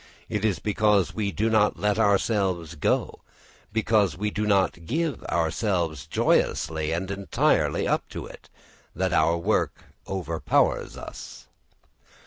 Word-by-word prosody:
It 105 -1 -2
is 105 -5 +1
because 105 -1 +2
we 105 -2 -1
do 110 +3 0
not 110 -2 +3
let 105 +1 0
ourselves 100 -5 +1
go, 75 - -1 0.5
because 110 -4 +2
we 105 +2 -1
do 105 +1 -2
not 95 -5 +1
give 160 -1 -1
ourselves 85 - -1
joyously 80 -1 +1
and 90 +4 -2
entirely 100 0 +1
up - - 0
to - - -6
it, - - -13 0.5
that - - 0
our 85 +2 +3
work 100 +6 0 0.2
overpowers 85 -4 0
us. - - -9
100 Hz, 125 wpm, -25 LUFS, 85-105 Hz, 0.5 s, not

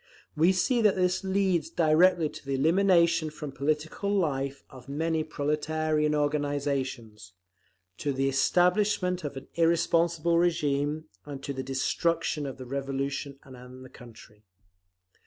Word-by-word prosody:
We 165 +4 +4
see 235 +6 +1
that 210 -3 +4
this 185 0 0
leads 190 -3 0
directly 165 +1 +3
to - - -11
the 135 0 -2
elimination 170 +1 +3
from 150 -1 -7
political 155 +7 -2
life 140 -8 -1
of 130 +1 -14
many 160 +2 -1
proletarian 150 0 -1
organisations, 140 - -2 0.7
to 145 - -1
the 135 0 0
establishment 180 +5 +2
of 140 -2 -5
an 135 - -9
irresponsible 170 0 +2
régime, 150 -3 0 0.2
and 140 -2 -8
to 140 - -4
the 130 - -4
destruction 150 +3 -1
of 135 - -7
the 130 - -8
Revolution 140 +1 -4
and 130 0 -12
the - - -13
country. 110 -4 -15
150 Hz, 130 wpm, -28 LUFS, 135-170 Hz, 0.7 s, We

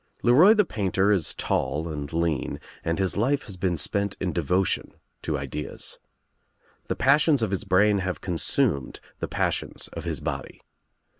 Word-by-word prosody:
LeRoy 155 - +7
the 210 - +5
painter 100 - +1
is 95 -7 +1
tall 75 +5 -1
and 75 -3 -5
lean 80 -4 -1 0.2
and 85 0 -1
his 95 -1 0
life 135 +6 +1
has 100 - -9
teen 90 -2 -1
spent 100 +6 -1
in 90 -3 -2
devotion 90 +3 0 0.3
to 80 -2 -1
ideas. 70 +2 -5 0.9
The - - -1
passions 140 -1 +4
of 105 - 0
his 95 - -2
brain 100 +2 +4
have 95 -1 -3
consumed 75 -6 0 0.2
the - - -2
passions - - -1
of - - -7
his - - -3
body. - - -5
95 Hz, 155 wpm, -26 LUFS, 80-105 Hz, 0.9 s, LeRoy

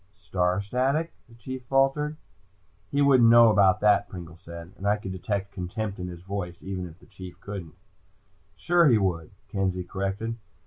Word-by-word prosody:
"Star 95 -2 0
static?" 135 +9 0 0.2
the 115 - -16
Chief 130 +2 -7
faltered. 135 +3 +1 0.7
"He 145 0 +2
wouldn't 130 -5 +6
know 115 -1 +8
about 100 -3 +4
that," 105 -1 +4
Pringle 85 -2 -9
said, 85 -1 -10
and 100 - -5
I 105 +1 +3
could 95 -2 -7
detect 100 +2 -3
contempt 100 +2 -4
in 90 - -4
his 85 -1 -9
voice, 90 -3 -5
even 95 -1 -4
if 80 -1 -14
the - - -20
Chief 90 -1 -11
didn't. 95 -5 -7 0.8
"Sure 175 -1 +3
he 120 -5 +5
would," 85 -6 -1 0.2
Kenzie 95 -2 -1
corrected. 100 +5 -3
100 Hz, 170 wpm, -26 LUFS, 90-115 Hz, 0.8 s, know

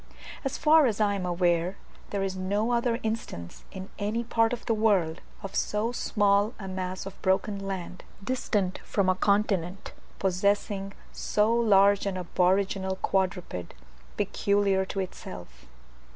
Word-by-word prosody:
As 270 - -2
far 305 -2 +6
as 220 -3 -1
I 205 -1 +3
am 190 -2 -2
aware, 175 +1 +1 0.3
there 200 -1 -1
is 190 -1 -2
no 200 +5 0
other 235 -1 +1
instance 220 - -5
in 190 0 -8
any 215 +3 -1
part 225 -1 +2
of 240 -1 -4
the 230 - +2
world, 195 -7 +2 0.2
of 195 0 -6
so 215 +3 0
small 205 -1 +2
a 195 - -7
mass 185 0 -4
of 195 - -9
broken 195 +2 +1
land, 185 -1 -5 0.2
distant 205 -5 -1
from 195 -2 0
a - - +5
continent, 195 -2 0 0.2
possessing 195 +1 0 0.2
so 215 +2 +1
large 200 -3 +4
an 190 -2 -2
aboriginal 190 +2 +1
quadruped 185 - -2 0.4
peculiar 200 -1 +1
to 195 +1 -3
itself. 90 - -9
195 Hz, 140 wpm, -28 LUFS, 185-210 Hz, 0.4 s, far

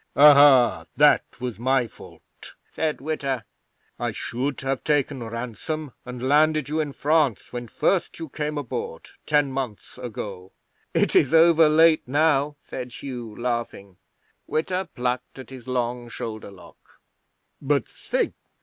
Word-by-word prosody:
'"Ahai! 140 - +7
That - - +4
was 125 -3 -5
my 130 +1 +2
fault," - - -14 0.2
said 155 -3 -2
Witta. 135 -5 -2 0.5
"I - - -1
should 130 +3 -3
have 135 0 -2
taken 145 -3 0
ransom 120 +6 -5
and 125 +1 -4
landed 155 0 +3
you 155 +1 -1
in 150 -2 -1
France 145 -8 +1
when 120 -1 -5
first 180 +8 0
you 165 - -6
came 150 +1 -4
aboard, 120 - -5 0.2
ten 145 -2 +2
months 130 -3 -5
ago." 100 -6 -7 0.4
'"It - - +2
is 165 - +4
over 165 -1 +6
late 160 -1 +4
now," 145 +1 +2
said 125 -2 -7
Hugh, 120 -6 -7
laughing. 120 -6 -4 0.5
'Witta 180 +4 -1
plucked 125 +1 -3
at 130 0 -10
his 130 -2 -11
long 120 -1 -2
shoulder 110 -3 -6
lock. 100 -2 -15 0.8
"But 140 -3 +1
think!" - - -2
135 Hz, 135 wpm, -24 LUFS, 120-150 Hz, 0.8 s, Ahai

